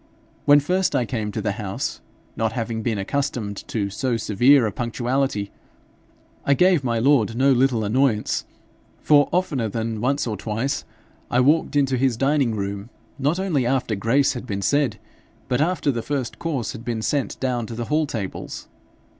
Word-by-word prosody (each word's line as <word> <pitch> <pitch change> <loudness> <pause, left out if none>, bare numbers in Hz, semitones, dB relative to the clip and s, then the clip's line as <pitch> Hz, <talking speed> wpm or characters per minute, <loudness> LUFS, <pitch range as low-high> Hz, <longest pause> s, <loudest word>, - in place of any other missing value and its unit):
When 145 0 +7
first 180 +6 0
I 125 - +2
came 110 -3 -3
to - - -4
the 105 - 0
house, 100 -3 -4 0.3
not 110 0 -1
having 115 -1 -3
been 110 -1 -1
accustomed 110 -2 -2
to 100 -3 -2
so 120 +3 -1
severe 120 +5 +4
a 110 - -1
punctuality, 120 -1 -1 0.9
I 140 - +3
gave 180 -2 +4
my 120 -2 0
lord 115 -3 +3
no 135 +3 +4
little 125 -3 +2
annoyance; 115 0 +1 0.6
for, 145 -1 +5
oftener 155 -11 0
than 110 0 -3
once 140 +4 +1
or 110 -3 -2
twice, 115 +7 -2 0.4
I 120 - +2
walked 150 +4 +3
into 135 -2 +2
his 130 -2 +1
dining 135 -3 +2
room 100 +1 -4 0.3
not 145 +6 +1
only 175 -9 +1
after 130 -3 0
grace 115 +8 +2
had 125 -1 -7
been 100 -3 -3
said, 140 -3 +1 0.5
but 125 +2 +1
after 160 -3 +1
the 120 -3 -3
first 135 -1 -3
course 145 -8 -2
had 115 -3 -9
been 115 -2 -3
sent 140 +5 -1
down 125 -3 -1
to 115 - -6
the 120 0 -3
hall 150 +2 +1
tables. 105 -8 -5
125 Hz, 170 wpm, -23 LUFS, 110-140 Hz, 0.9 s, When